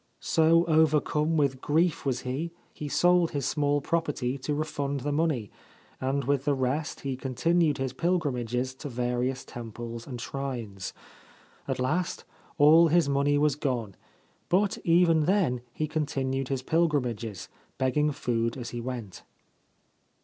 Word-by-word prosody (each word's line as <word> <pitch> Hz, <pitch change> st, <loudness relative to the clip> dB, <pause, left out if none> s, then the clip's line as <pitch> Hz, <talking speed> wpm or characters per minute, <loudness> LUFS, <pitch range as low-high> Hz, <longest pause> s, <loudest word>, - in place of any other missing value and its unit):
So 165 Hz, +1 st, +4 dB
overcome 155 Hz, 0 st, +2 dB
with 135 Hz, -3 st, +1 dB
grief 160 Hz, 0 st, +1 dB
was 125 Hz, -2 st, 0 dB
he, 135 Hz, +6 st, -3 dB, 0.2 s
he 150 Hz, -, -6 dB
sold 175 Hz, +1 st, +4 dB
his 140 Hz, -3 st, -1 dB
small 145 Hz, 0 st, +1 dB
property 145 Hz, -5 st, -1 dB
to 145 Hz, +3 st, -2 dB
refund 145 Hz, -2 st, -2 dB
the 145 Hz, -, -2 dB
money, 145 Hz, -8 st, 0 dB, 0.5 s
and 135 Hz, +2 st, -1 dB
with 140 Hz, +1 st, 0 dB
the 145 Hz, -, +2 dB
rest 135 Hz, +4 st, -2 dB
he 135 Hz, -2 st, -2 dB
continued 150 Hz, +5 st, +1 dB
his 130 Hz, -1 st, -2 dB
pilgrimages 130 Hz, -7 st, -1 dB
to 135 Hz, +2 st, -7 dB
various 125 Hz, +1 st, -1 dB
temples 115 Hz, 0 st, -7 dB
and 125 Hz, -3 st, -6 dB
shrines. 120 Hz, -8 st, -5 dB, 0.7 s
At -, -, -1 dB
last 150 Hz, +8 st, -1 dB, 0.3 s
all 160 Hz, +3 st, +7 dB
his 165 Hz, -1 st, +3 dB
money 140 Hz, +1 st, +2 dB
was 150 Hz, 0 st, +3 dB
gone; 120 Hz, -9 st, -2 dB, 0.5 s
but 195 Hz, +2 st, +2 dB
even 165 Hz, -2 st, +4 dB
then 175 Hz, -10 st, +2 dB
he 155 Hz, +5 st, -2 dB
continued 135 Hz, -3 st, -1 dB
his 135 Hz, -1 st, -2 dB
pilgrimages, 125 Hz, -, 0 dB, 0.3 s
begging 150 Hz, +3 st, +1 dB
food 115 Hz, -4 st, -1 dB
as 120 Hz, -2 st, -6 dB
he 120 Hz, -, -4 dB
went. 120 Hz, -6 st, -6 dB
140 Hz, 140 wpm, -28 LUFS, 125-155 Hz, 0.7 s, all